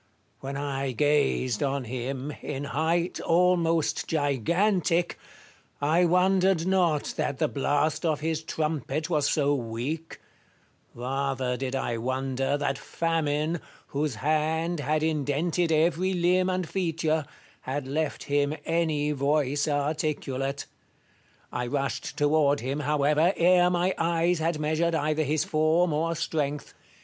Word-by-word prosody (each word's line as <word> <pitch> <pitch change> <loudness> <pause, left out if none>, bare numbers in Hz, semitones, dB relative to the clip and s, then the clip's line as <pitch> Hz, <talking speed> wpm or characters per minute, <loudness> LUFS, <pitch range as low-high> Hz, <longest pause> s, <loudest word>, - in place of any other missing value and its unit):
When 135 +1 -5
I 135 -2 -2
gazed 145 -4 +1
on 140 -1 0
him, 130 +4 -4
in 140 -1 -4
height 160 +5 0
almost 170 -2 +2
gigantic, 170 - +1 0.6
I 160 +5 +3
wondered 180 0 +3
not 180 -6 +1
that 140 - -1
the - - +1
blast 145 +2 0
of 155 -3 +1
his 160 0 -1
trumpet 155 -1 -2
was 150 -3 +2
so 145 -1 +2
weak: 130 +6 -4 0.8
rather 130 0 -2
did 130 +1 -3
I 120 -3 -1
wonder 135 +2 -1
that 140 -1 -1
Famine, 160 -1 -1 0.3
whose 145 -2 -1
hand 155 +5 0
had 150 +2 0
indented 160 +3 0
every 170 +4 +2
limb 180 +1 +2
and 185 -2 -1
feature, 160 -4 0 0.4
had 130 +1 -4
left 155 +2 -2
him 145 +1 +1
any 155 -3 0
voice 145 0 +1
articulate. 145 -2 -2 0.9
I 125 0 -2
rushed 140 +1 -3
toward 145 -1 +3
him, 135 +4 -2
however, 150 +4 +2
ere 180 +1 +5
my 180 +1 +1
eyes 170 +1 +1
had 165 0 0
measured 160 +2 0
either 155 0 0
his 155 0 +1
form 155 +2 +2
or 165 +2 0
strength. 150 -3 -2
150 Hz, 125 wpm, -27 LUFS, 140-165 Hz, 0.9 s, ere